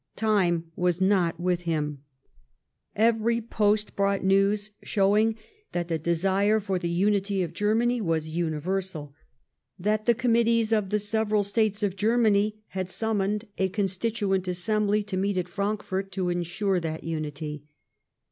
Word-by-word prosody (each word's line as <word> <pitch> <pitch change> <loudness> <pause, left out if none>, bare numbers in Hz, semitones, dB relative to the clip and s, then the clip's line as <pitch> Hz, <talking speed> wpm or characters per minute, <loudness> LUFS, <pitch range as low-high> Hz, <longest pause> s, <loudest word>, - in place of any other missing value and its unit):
Time 175 -7 +1
was 180 -1 0
not 185 -4 +2
with 175 0 0
him. 150 -4 -2 0.9
Every 230 +1 +2
])ost 215 -2 0
brought 200 0 +1
news 200 +2 +2
showing 210 +3 +2 0.4
that 175 0 -2
the 165 -1 0
desire 190 +6 +2
for 195 -3 -2
the 170 - -2
unity 195 +2 +1
of 170 -1 -5
Germany 225 +5 +1
was 160 -3 -1
universal; 170 -1 -2 0.6
that 215 +3 0
the 235 - +4
committees 230 -2 +2
of 210 -3 +1
the 210 - +2
several 210 0 +1
States 210 0 0
of 195 -2 0
Germany 215 0 +2
had 190 -1 -3
sunnnuned 210 +1 -1 0.2
a 190 0 +2
Constituent 195 0 -1
Assemblv 210 +3 0
to 200 -3 -3
meet 195 0 0
at 180 -1 -1
Frankfort 195 0 -3
to 185 -1 -1
ensure 175 +2 0
that 160 -2 -4
unity. 150 -2 -5
195 Hz, 140 wpm, -26 LUFS, 175-215 Hz, 0.9 s, the